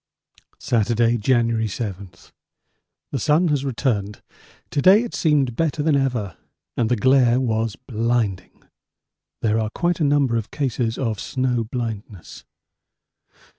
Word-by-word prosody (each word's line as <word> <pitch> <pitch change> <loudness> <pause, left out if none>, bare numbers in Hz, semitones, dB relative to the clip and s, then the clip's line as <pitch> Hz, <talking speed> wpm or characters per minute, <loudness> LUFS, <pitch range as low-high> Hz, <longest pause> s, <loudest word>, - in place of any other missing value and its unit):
Saturday, 120 -2 +1
January 115 -1 +1
7. 100 -2 -5 1.0
The 135 - -2
sun 155 +8 +2
has 145 -2 0
returned. 115 -6 -2 0.5
To 145 - 0
day 195 +7 +6
it 240 - -7
seemed 140 -7 +1
better 155 -1 -1
than 155 -1 +2
ever 120 - -1 0.4
and 115 -2 0
the 125 - +3
glare 125 +1 +4
was 115 -4 -1
blinding. 115 -5 -2 0.8
There 110 0 +2
are 110 -1 -1
quite 175 +9 -1
a - - +1
number 140 -5 +2
of 110 -1 -4
cases 125 -5 -2
of 115 -5 -2
snow 130 -3 -1
blindness. 110 -5 -6
120 Hz, 130 wpm, -22 LUFS, 110-140 Hz, 1.0 s, day